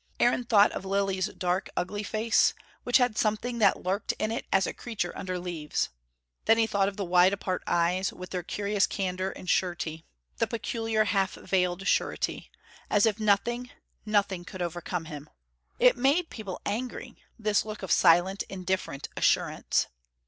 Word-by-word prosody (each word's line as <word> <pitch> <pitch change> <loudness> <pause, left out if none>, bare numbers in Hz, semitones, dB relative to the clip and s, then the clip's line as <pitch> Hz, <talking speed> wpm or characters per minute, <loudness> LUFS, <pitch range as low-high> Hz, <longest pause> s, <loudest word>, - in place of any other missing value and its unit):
Aaron 245 0 +3
thought 210 -3 +5
of - - -5
Lilly's 195 0 0
dark, 180 -2 -2
ugly 205 +4 -2
face, 220 +2 +2 0.3
which 245 - +4
had 245 -4 +1
something 230 +3 0
that 200 -3 +3
lurked 190 +3 -1
in 215 +1 -2
it 230 - -4
as 195 0 +4
a - - -3
creature 220 -7 -4
under 185 -1 -4
leaves. 175 -4 -2 0.6
Then 225 - +5
he 225 - +4
thought 200 -3 +1
of 195 - -4
the 200 - -2
wide 180 +2 +5
apart 185 -2 -2
eyes, 180 +2 +1
with 180 0 -10
their 180 - -2
curious 200 +3 0
candour 185 -1 -2
and 185 - -10
surety. 170 -3 -1 0.3
The - - +1
peculiar, 225 -1 -1
half 195 -1 +1
veiled 180 0 0
surety, - - 0 0.4
as 205 +1 +4
if 220 -1 +1
nothing, 235 +4 +1 0.3
nothing 200 -4 0
could 180 0 -6
overcome 175 0 -4
him. 150 -2 -8 0.5
It 250 0 +5
made 285 +7 +2
people 200 -5 -6
angry, 240 +5 -4 0.2
this 215 -2 +1
look 215 -2 -7
of 190 - -4
silent, 180 +3 +4
indifferent 185 -6 -3
assurance. - - +1
195 Hz, 165 wpm, -28 LUFS, 180-215 Hz, 0.6 s, thought